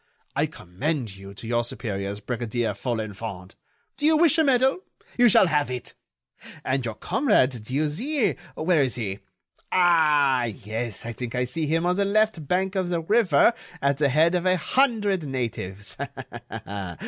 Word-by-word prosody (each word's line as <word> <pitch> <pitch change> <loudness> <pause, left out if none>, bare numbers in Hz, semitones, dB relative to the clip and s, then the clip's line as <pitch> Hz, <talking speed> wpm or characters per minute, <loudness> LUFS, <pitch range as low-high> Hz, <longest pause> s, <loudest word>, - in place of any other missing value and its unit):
I - - +2
commend 115 - -4
you 100 0 -11
to 115 - -9
your 120 0 +1
superiors, 100 -3 -4
Brigadier 120 0 -2
Folenfant.... 110 -5 -5 0.4
Do 295 - +1
you 315 0 +5
wish 325 0 +4
a - - +5
medal? 265 +2 +3 0.4
You 245 -1 +6
shall 195 - +6
have 150 -5 +1
it. 125 -1 -5 0.7
And 130 0 0
your 115 -3 -4
comrade 205 - +2
Dieuzy, 155 - 0 0.2
where 160 -1 +2
is 130 -3 +1
he?... 100 -4 -4 0.5
Ah! 150 -8 +4
yes, 110 0 -4
I 115 - -4
think 120 +1 -5
I 125 - +1
see 150 +5 -1
him 165 +3 +1
on 180 +1 +1
the 200 - +2
left 210 -6 +1
bank 190 +3 0
of 185 -3 -1
the 170 -2 0
river 205 0 +4 0.3
at 140 -1 +1
the 145 -2 +3
head 160 +6 +3
of 180 0 0
a 185 0 +3
hundred 210 - +1
natives. 105 -6 -4
145 Hz, 160 wpm, -25 LUFS, 115-185 Hz, 0.7 s, You